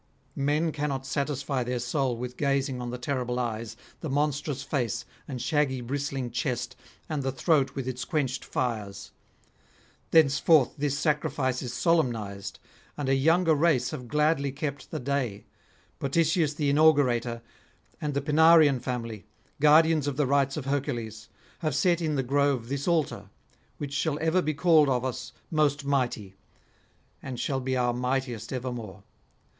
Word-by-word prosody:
Men 150 +4 +1
cannot 145 -3 -3
satisfy 140 -1 -1
their 125 +1 -2
soul 125 0 -1
with 125 +1 -5
gazing 140 -2 0
on 120 - -4
the 125 - -4
terrible 125 -1 -2
eyes, 115 -2 -3 0.2
the 160 - -5
monstrous 145 0 -1
face 120 -4 -2 0.2
and 130 -3 -5
shaggy 145 -3 +1
bristling 135 0 -3
chest, 125 -1 -2 0.3
and 155 -3 -2
the 135 0 -1
throat 140 0 +1
with 135 -2 -4
its 130 -1 -3
quenched 140 -6 -1
fires. 105 -6 -3 1.0
Thenceforth 150 -2 +4
this 145 -1 -1
sacrifice 145 -4 0
is 125 - -4
solemnised, 115 - 0 0.4
and 140 -2 -2
a - - +4
younger 165 +5 +3
race 155 -3 +2
have 125 - -6
gladly 150 0 +1
kept 140 0 -5
the - - -4
day; 125 -6 -2 0.5
Potitius 155 +1 +1
the 145 -2 +1
inaugurator, 125 -6 +3 0.6
and 150 -2 -2
the 140 - +1
Pinarian 155 -1 +5
family, 115 -5 -5 0.3
guardians 155 0 +5
of 140 -2 -2
the 150 - +2
rites 135 +1 +1
of 145 - -4
Hercules, 120 -6 -3 0.3
have 155 -4 -1
set 170 +3 +2
in 155 -2 0
the 135 - 0
grove 135 -2 +1
this 140 +2 -3
altar, 165 -4 0 0.5
which 140 -1 -5
shall 145 0 0
ever 160 +3 +2
be 155 -3 -2
called 155 -2 +5
of 125 -1 0
us 130 0 -4 0.2
Most 150 -2 +1
Mighty, 125 -8 -1 0.9
and 130 -2 -6
shall 135 -2 -1
be 130 0 -1
our 120 -1 +1
mightiest 125 -2 -2
evermore. 120 -7 -5
135 Hz, 150 wpm, -27 LUFS, 125-150 Hz, 1.0 s, Pinarian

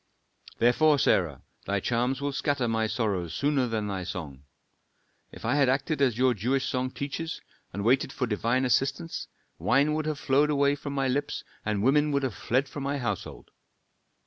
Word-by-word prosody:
"Therefore, 145 +6 +4
Sarah, 85 - +1 0.2
thy 100 0 +1
charms 125 +5 0
will 145 0 -1
scatter 140 -3 0
my 110 -1 +1
sorrows 100 -6 -2
sooner 140 -3 +1
than 110 -2 -2
thy 95 -2 -3
song. 75 -7 -7 0.9
If - - -10
I 115 - +2
had 140 -3 +3
acted 135 +3 0
as 125 -5 +3
your 130 0 +4
Jewish 125 +5 0
song 130 0 -1
teaches, 145 +5 -4 0.3
and 100 +2 -4
waited 130 +4 +3
for 130 - -1
divine 120 +3 0
assistance, 135 +6 0 0.3
wine 140 +6 +3
would 155 0 -1
have 155 -2 -1
flowed 145 +2 +2
away 140 -1 +3
from 145 0 -5
my 135 -1 0
lips, 145 +3 -1 0.2
and 105 -2 -1
women 150 +4 +3
would 140 0 +1
have 130 -4 -1
fled 130 +9 0
from 145 - -7
my 140 +1 -1
household. 105 -8 -5
130 Hz, 175 wpm, -27 LUFS, 110-140 Hz, 0.9 s, Therefore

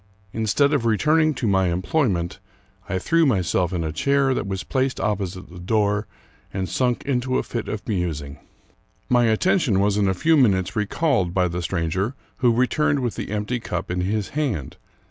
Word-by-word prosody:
Instead 115 +7 +2
of 140 -5 +1
returning 155 +8 +3
to 125 - -3
my 95 -3 +3
employment, 90 - 0 0.5
I 95 - 0
threw 165 - +2
myself 90 -5 +1
in 90 -3 -2
a 80 - -2
chair 140 - +2
that 100 - -2
was 95 -1 -3
placed 130 0 -1
opposite 95 -4 -2
the 90 - -10
door, 105 +2 0 0.4
and 95 -1 -3
sunk 125 +2 0
into 130 -1 0
a - - 0
fit 115 -2 -4
of 110 - -5
musing. 80 -8 -3 0.7
My 120 -1 +4
attention 120 - +2
was 100 +1 +2
in 100 -1 +2
a 95 - +1
few 160 - +3
minutes 95 -9 +2
recalled 105 - 0
by 90 -1 +3
the 90 +1 -3
stranger, 95 - -1 0.2
who 125 -2 +3
returned 135 +4 +1
with 120 -3 -1
the - - -5
empty 105 +4 -2
cup 110 - -4
in 90 0 -1
his 100 +2 -1
hand. 130 - -3
105 Hz, 180 wpm, -23 LUFS, 95-130 Hz, 0.7 s, My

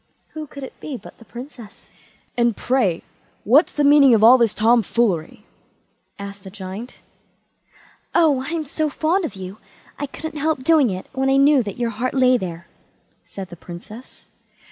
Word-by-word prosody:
Who 310 -1 -7
could 280 0 -10
it 265 - -10
be 280 -4 -6
but - - -14
the 230 - -15
Princess. 240 -3 -12 0.4
"And, 235 -2 +1
pray, 230 -10 0 0.4
what's 275 - +4
the 295 - -1
meaning 285 -3 +6
of 215 - +2
all 250 +3 +8
this 230 -3 +2
tom 230 +2 +4
foolery?" 210 -3 -1 0.7
asked 200 -1 -9
the 190 - -9
Giant. 195 +5 -9 1.1
"Oh, 300 -6 +3
I'm 320 0 -3
so 310 +2 -2
fond 330 +6 0
of 300 - -6
you, 190 +2 -8 0.4
I 285 - -3
couldn't 310 +2 -7
help 305 -3 -1
doing 300 -4 +4
it 185 -1 -5
when 265 0 0
I 270 - +3
knew 280 0 +5
that 205 -4 -6
your 240 -1 -1
heart 250 +4 -3
lay 255 -1 +4
there", 175 -6 -4 0.6
said 190 -2 -8
the 175 - -10
Princess. 180 +8 -12
245 Hz, 170 wpm, -21 LUFS, 205-285 Hz, 1.1 s, all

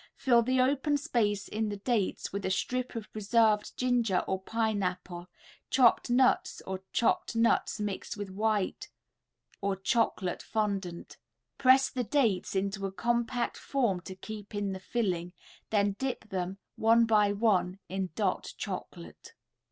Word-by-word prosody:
Fill 240 -3 +4
the 255 +2 +1
open 280 +3 +2
space 210 -7 0
in 215 0 -2
the 205 - -4
dates 210 -3 -1
with 200 0 -3
a - - 0
strip 250 +6 -2
of 225 -2 -7
preserved 215 0 +2
ginger 240 -7 +2
or 190 0 -1
pineapple, 190 -5 -2 0.4
chopped 250 -1 +4
nuts 265 +9 +3
or 190 0 -4
chopped 235 - +1
nuts 230 -1 +2
mixed 205 0 -4
with 205 -2 -5
white 210 0 -1 0.7
or 200 -1 0
chocolate 195 -3 0
fondant; 200 -5 -3 0.4
press 260 0 +6
the 250 - -1
dates 225 -8 +1
into 195 0 -1
a - - -6
compact 235 +4 -1
form 235 -10 0
to 185 +1 -9
keep 210 +1 -8
in 205 -1 -1
the 190 - -6
filling, 185 -5 -2 0.4
then 205 -1 +2
dip 260 -4 -3
them, 185 0 -3 0.2
one 230 +1 +5
by 210 -2 +4
one, 200 -3 +1
in 190 0 -3
"Dot" 200 -4 -1
Chocolate. 80 -2 -7
210 Hz, 145 wpm, -30 LUFS, 190-235 Hz, 0.7 s, press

